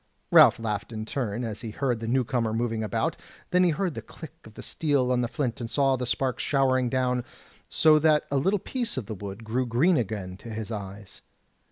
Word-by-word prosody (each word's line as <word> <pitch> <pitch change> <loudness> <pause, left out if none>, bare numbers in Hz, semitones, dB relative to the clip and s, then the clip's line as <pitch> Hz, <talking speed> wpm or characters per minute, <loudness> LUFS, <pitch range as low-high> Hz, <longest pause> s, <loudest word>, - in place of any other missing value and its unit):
Ralph - - +8
laughed 105 -1 -3
in 110 -1 -5
turn, 120 -2 -3
as 110 -2 -4
he 115 - -5
heard 125 +1 -1
the 115 - -5
new 130 +2 +2
comer 115 -2 -1
moving 115 -1 -1
about; 105 - -1 0.3
then 180 0 +4
he 180 - +4
heard 170 +2 -1
the - - -6
click 160 -4 -11
of 110 -1 -14
the - - -9
steel 140 -5 0
on 125 -1 +2
the 120 - 0
flint, 125 -1 -3
and 115 - -4
saw 135 0 +2
the 125 -1 -3
sparks 130 +1 -1
showering 130 -3 +2
down, 125 -1 0 0.5
so 155 -1 +5
that 155 -1 +4
a 140 - +2
little 190 +10 +2
piece 235 - -4
of 125 - -3
the 110 - -5
wood 100 +2 -7
grew 120 +3 -1
green 150 +10 +3
again 100 -5 -3
to 115 - -11
his 110 0 -5
eyes. 100 -1 -7
125 Hz, 220 wpm, -26 LUFS, 110-140 Hz, 0.5 s, Ralph